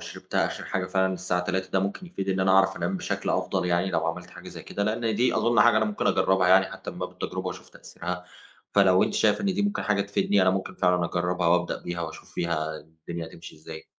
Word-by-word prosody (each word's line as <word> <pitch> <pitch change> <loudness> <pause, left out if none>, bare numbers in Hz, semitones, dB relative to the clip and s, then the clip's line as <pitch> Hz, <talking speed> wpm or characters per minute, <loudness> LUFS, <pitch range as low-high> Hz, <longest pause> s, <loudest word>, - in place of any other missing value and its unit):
شربتها - - -2
آخر - - -6
حاجة 90 -1 -2
فعلًا 95 0 +1
الساعة 90 -1 -1
15:00 95 +1 -2
ده 95 - +2
ممكن 100 - -3
يفيد 100 - -5
إن 95 0 +1
أنا 95 - +3
أعرف 95 0 +4
أنام 90 +3 -1
بشكل - - -2
أفضل؟ - - 0
يعني، 90 +2 +1
لو 80 -1 0
عملت 90 +2 -4
حاجة - - -11
زي - - -9
كده، 100 - -4
لأن 110 +1 0
دي 120 +4 +2
أظن 120 -2 +3
حاجة 120 0 +6
أنا 110 - +3
ممكن 105 -1 -2
أجرّبها 95 -1 +3
يعني 95 +1 +6
حتى - - -8
من - - -11
باب - - -4
التجربة، - - -5
وأشوف - - -6
تأثيرها. 90 +1 -7 0.5
فلو 95 -2 +5
أنتِ - - 0
شايفة 105 -1 +3
إن 200 - -1
دي 205 - 0
ممكن 205 0 -1
حاجة 105 -2 +1
تفيدني، 100 0 +1
أنا 95 - +5
ممكن 95 0 -3
فعلًا 90 -1 +2
أجرّبها 90 0 -1
وأبدأ 90 0 +1
بيها، 85 0 -4
وأشوف 80 -1 -8
فيها 80 -2 -2
الدنيا 80 +2 -8
هتمشي 85 +1 -12
إزاي. 80 0 -10
95 Hz, 230 wpm, -26 LUFS, 85-100 Hz, 0.5 s, حاجة